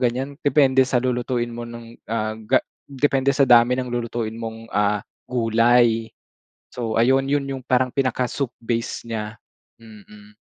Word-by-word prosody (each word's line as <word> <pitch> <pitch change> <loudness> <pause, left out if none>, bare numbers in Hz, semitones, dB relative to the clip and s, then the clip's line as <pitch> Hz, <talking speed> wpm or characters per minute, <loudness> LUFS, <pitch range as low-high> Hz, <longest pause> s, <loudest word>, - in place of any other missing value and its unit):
ganyan, 130 +3 -1
depende 140 -3 +3
sa 130 - +1
lulutuin 120 -1 -1
mo 120 0 -7
nung, 115 0 -10 0.2
ah, 110 -1 -1
ga 110 +4 +1 0.3
depende 140 0 +1
sa 140 -1 +2
dami 120 +1 +6
ng 125 - -5
lulutuin 115 -2 -3
mong, 115 0 -7
ah, 105 0 +1 0.2
gulay. 115 -1 +2 0.6
So 115 -2 -4
ayun, 130 +4 +3
yun 145 +1 +1
yung 135 - -3
parang 130 0 +2
pinaka 130 -1 -1
soup 135 -4 -3
base 115 0 -2
niya, 110 -1 -4 0.5
mm. 105 -1 -15
120 Hz, 150 wpm, -22 LUFS, 115-130 Hz, 0.6 s, dami